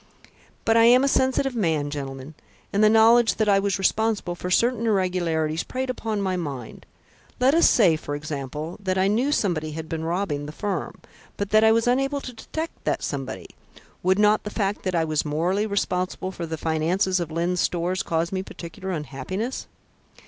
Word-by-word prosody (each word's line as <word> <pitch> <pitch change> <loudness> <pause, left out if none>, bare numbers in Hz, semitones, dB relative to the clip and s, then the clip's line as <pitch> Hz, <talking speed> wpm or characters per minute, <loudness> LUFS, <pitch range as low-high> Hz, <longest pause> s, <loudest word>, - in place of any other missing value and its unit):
"But 225 0 +4
I 230 - +6
am 250 +3 +6
a - - +3
sensitive 265 0 +1
man, 160 -9 0
gentlemen; 135 0 -6 0.4
and 205 +2 +3
the 215 - +7
knowledge 225 +1 +5
that 215 - 0
I 200 -1 +5
was 195 -1 0
responsible 210 -1 0
for 180 +1 -5
certain 230 +4 +2
irregularities 175 -6 0
preyed 260 0 -3
upon 220 -4 -3
my 190 -1 0
mind. 140 -9 -6 0.5
Let 260 +2 +4
us 335 - +5
say, 185 -9 +5
for 145 -1 -5
example, 150 +2 -5
that 190 -1 -1
I 190 +1 +3
knew 240 +8 +1
somebody 160 - 0
had 160 +1 -6
been 160 0 -4
robbing 165 -4 -2
the - - -6
firm, 205 +5 -4 0.4
but 200 0 -3
that 215 +1 +5
I 220 - +6
was 230 0 +2
unable 270 +3 +1
to 255 -2 -8
detect 320 +8 -6
that - - -1
somebody. - - -5 0.5
Would 185 +1 +2
not 210 +1 +4
the 210 - -4
fact 205 -1 -2
that 185 -1 0
I 165 -1 +2
was 155 -1 0
morally 175 +8 0
responsible 185 -2 -2
for 170 -2 -6
the 160 0 -4
finances 170 +5 0
of 170 -2 -3
Lyne's 170 +2 0
Stores 180 +2 0
cause 165 +1 -1
me 190 -1 -1
particular 185 0 -8
unhappiness?" 185 - -4
185 Hz, 185 wpm, -24 LUFS, 160-220 Hz, 0.5 s, the